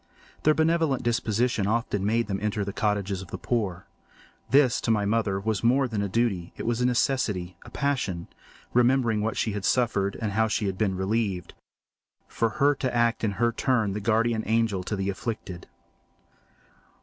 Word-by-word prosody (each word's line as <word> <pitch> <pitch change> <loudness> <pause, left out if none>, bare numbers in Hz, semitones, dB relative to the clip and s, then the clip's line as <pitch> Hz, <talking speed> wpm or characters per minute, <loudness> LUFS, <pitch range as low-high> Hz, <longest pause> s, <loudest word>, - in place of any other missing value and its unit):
Their 155 0 +4
benevolent 160 -4 +2
disposition 115 -2 0
often 110 -3 0
made 115 +3 +1
them 95 -1 -3
enter 105 -1 -1
the 100 - -4
cottages 100 -2 -1
of 95 - -9
the - - -6
poor. 100 -7 -2 0.6
This, 135 -1 +4
to - - -3
my 105 -2 +2
mother, 100 -2 +1
was 110 +2 -2
more 130 +3 +3
than 110 -4 -2
a 100 - -2
duty; 100 -5 -1
it - - -5
was 120 +1 0
a 125 - +3
necessity, 110 -8 0
a - - -10
passion—remembering 120 0 -1
what 110 +1 -2
she 110 - 0
had 100 -1 -4
suffered, 100 -5 +1
and 110 -3 -2
how 110 +2 +2
she 110 0 -1
had 95 -1 -1
been 95 -4 +1
relieved—for 100 +2 -4
her 140 +6 +3
to 130 -3 -3
act 115 -1 +2
in 105 -2 +1
her 120 +3 +1
turn 115 -4 +1
the 105 - -3
guardian 115 +2 +1
angel 110 -3 +1
to 105 - -2
the 95 0 -1
afflicted. 95 -4 -6
110 Hz, 175 wpm, -26 LUFS, 100-120 Hz, 0.6 s, Their